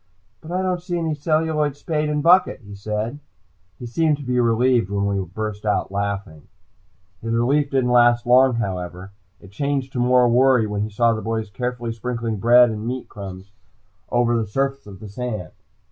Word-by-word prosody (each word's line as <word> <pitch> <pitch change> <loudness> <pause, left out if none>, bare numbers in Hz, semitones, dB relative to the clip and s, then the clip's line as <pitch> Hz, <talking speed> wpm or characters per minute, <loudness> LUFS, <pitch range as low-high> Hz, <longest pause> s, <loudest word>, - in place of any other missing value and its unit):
"But 160 - -10
I 185 +1 -1
don't 180 -2 -1
see 175 -1 -3
any 165 -2 -1
celluloid 155 -1 0
spade 150 0 -2
and 150 -1 -1
bucket," 175 -3 +4
he 100 -2 -12
said. 105 +6 -4 0.6
He 125 - -8
seemed 145 +2 0
relieved 120 -2 +2
when 100 0 -1
we 100 -1 -1
burst 105 +3 -6
out 105 -2 -1
laughing. 100 -6 -4 0.7
His 115 0 -2
relief 140 +5 +2
didn't 130 -3 +1
last 120 0 +4
long, 125 +1 +5
however. 95 -3 -4 0.3
It 100 - -15
changed 135 +3 -2
to 125 - -2
more 125 0 +4
worry 125 -1 +4
when 105 -1 -3
he 105 - -2
saw 115 +2 +2
the 110 - -4
boys 110 -2 -3
carefully 125 +2 -3
sprinkling 115 -1 -3
bread 120 +3 +5
and 110 +1 -5
meat 130 0 -4
crumbs 95 -2 -9 0.6
over 120 -1 +2
the 115 -2 -1
surface 135 +2 -2
of 95 -2 -11
the 105 - -8
sand. 110 -2 -5
120 Hz, 175 wpm, -22 LUFS, 105-135 Hz, 0.7 s, long